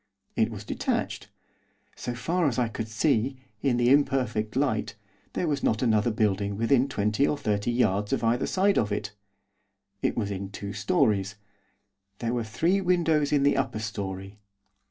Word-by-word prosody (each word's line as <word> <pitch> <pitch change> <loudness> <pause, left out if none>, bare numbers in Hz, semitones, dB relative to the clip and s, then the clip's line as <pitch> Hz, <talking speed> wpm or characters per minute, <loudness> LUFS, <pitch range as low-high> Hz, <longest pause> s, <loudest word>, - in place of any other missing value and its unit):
It 110 - +2
was 105 -3 -7
detached. - - -2 0.7
So 120 - -4
far 165 +7 0
as 125 - -1
I 120 -2 +1
could 115 0 -4
see, 120 +3 +1 0.2
in 130 -4 +2
the 120 +1 +3
imperfect 130 -6 +1
light, 130 -6 0 0.4
there 175 - -1
was 145 -2 0
not 110 +3 +1
another 110 -1 +3
building 100 -2 0
within 125 +4 +3
twenty 105 +3 +1
or 150 - 0
thirty 105 -3 -1
yards 105 -4 +1
of - - 0
either 115 +3 +1
side 195 +1 +2
of 105 -2 -1
it. 105 0 -2 0.9
It - - 0
was 105 -3 -1
in 95 0 -4
two 100 0 -6
storeys. 105 - +1 0.8
There 115 +2 -2
were 120 -1 0
three 170 - +1
windows 165 -5 +2
in 145 -2 +3
the 140 - +4
upper 135 -4 -1
storey. 100 -2 -5
115 Hz, 165 wpm, -27 LUFS, 105-140 Hz, 0.9 s, the